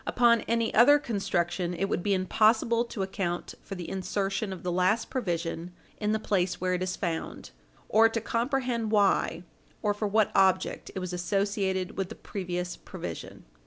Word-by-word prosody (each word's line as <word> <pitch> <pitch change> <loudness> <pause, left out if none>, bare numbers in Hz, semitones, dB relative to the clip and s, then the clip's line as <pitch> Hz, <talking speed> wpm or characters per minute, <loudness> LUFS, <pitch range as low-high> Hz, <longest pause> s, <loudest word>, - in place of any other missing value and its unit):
Upon 235 -2 +4
any 230 0 +1
other 275 +6 +7
construction, 180 - -1
it 195 - 0
would 195 - -1
be 200 +2 +1
impossible 220 +5 +3
to 220 -4 -4
account 190 -2 -3
for 195 - -7
the 175 -2 -6
insertion 195 +2 -2
of 185 - -7
the 180 - -1
last 185 +6 +1
provision 175 -7 -3 0.3
in 210 0 0
the 220 - +2
place 185 -4 0
where 185 0 0
it 180 - -1
is 185 0 -1
found, 165 -3 -4 0.4
or 225 +1 +5
to 230 - -1
comprehend 235 -1 -1
why 195 -5 +2 0.4
or 210 -1 +2
for 205 +1 -2
what 215 +1 +2
object 190 -1 +2
it - - -2
was 185 -1 -4
associated 195 +1 -1
with 190 -1 -1
the - - -8
previous 180 -2 -4
provision. - - -8
195 Hz, 170 wpm, -28 LUFS, 180-220 Hz, 0.4 s, other